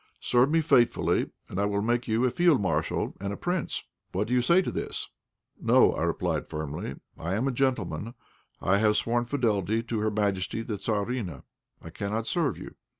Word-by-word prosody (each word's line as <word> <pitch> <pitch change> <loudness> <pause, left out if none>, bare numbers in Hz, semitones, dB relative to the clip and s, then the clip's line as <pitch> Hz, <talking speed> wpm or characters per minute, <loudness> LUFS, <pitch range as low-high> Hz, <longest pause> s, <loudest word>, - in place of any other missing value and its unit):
Serve 125 +2 +3
me 165 +1 +3
faithfully, 125 -6 +3 0.2
and 90 - -4
I 100 - +2
will 100 0 0
make 120 +2 0
you 115 +3 +2
a 125 - +2
field 175 -3 +4
marshal 95 -2 -1
and 100 +1 -3
a 100 - -4
prince. 175 -2 -2 0.3
What 100 +3 0
do - - 0
you 125 - +4
say 170 +8 +5
to - - -2
this?" - - -4 0.5
"No," - - +5
I - - -3
replied, - - -1
firmly. 75 -3 -4 0.2
"I 85 +4 -2
am 120 +6 0
a - - +1
gentleman. 115 - -1 0.4
I 95 +2 +2
have 105 0 +3
sworn 120 +3 +1
fidelity 115 -4 0
to 115 -1 -2
Her 110 +1 +1
Majesty 105 +1 -1
the 110 -3 -4
Tzarina; 100 - -2 0.4
I - - -9
cannot 105 +3 -3
serve 165 0 0
you. - - -9
110 Hz, 190 wpm, -28 LUFS, 100-125 Hz, 0.5 s, say